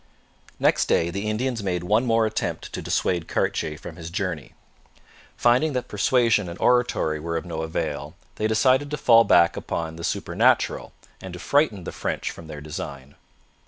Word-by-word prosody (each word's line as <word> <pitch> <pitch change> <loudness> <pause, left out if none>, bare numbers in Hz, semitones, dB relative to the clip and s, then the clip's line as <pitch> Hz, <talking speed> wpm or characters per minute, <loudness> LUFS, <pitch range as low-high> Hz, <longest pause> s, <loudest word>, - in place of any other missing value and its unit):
Next - - +3
day 85 +1 +2
the 100 +4 -3
Indians 120 +2 -1
made 90 -3 -2
one 110 +7 +2
more 115 -1 +3
attempt 110 - -3
to - - -4
dissuade 85 -3 -1
Cartier 75 -1 -1
from 90 - -10
his 85 -1 -7
journey. 85 -5 -4 0.8
Finding 125 +6 +3
that 125 -1 -2
persuasion 110 -2 +2
and 85 - -8
oratory 120 -11 +2
were 85 +2 -3
of 80 - -5
no 80 -2 -4
avail, 80 0 -4 0.2
they 110 - 0
decided 130 +6 +3
to 150 - -3
fall 115 -4 +6
back 85 -3 +5
upon 80 -1 -4
the 85 - -8
supernatural - - +1 0.3
and 95 -2 -8
to 90 - -7
frighten 110 - +1
the - - -5
French - - -3
from 85 - -12
their 75 -1 -8
design. 70 -2 -7
95 Hz, 170 wpm, -24 LUFS, 85-115 Hz, 0.8 s, fall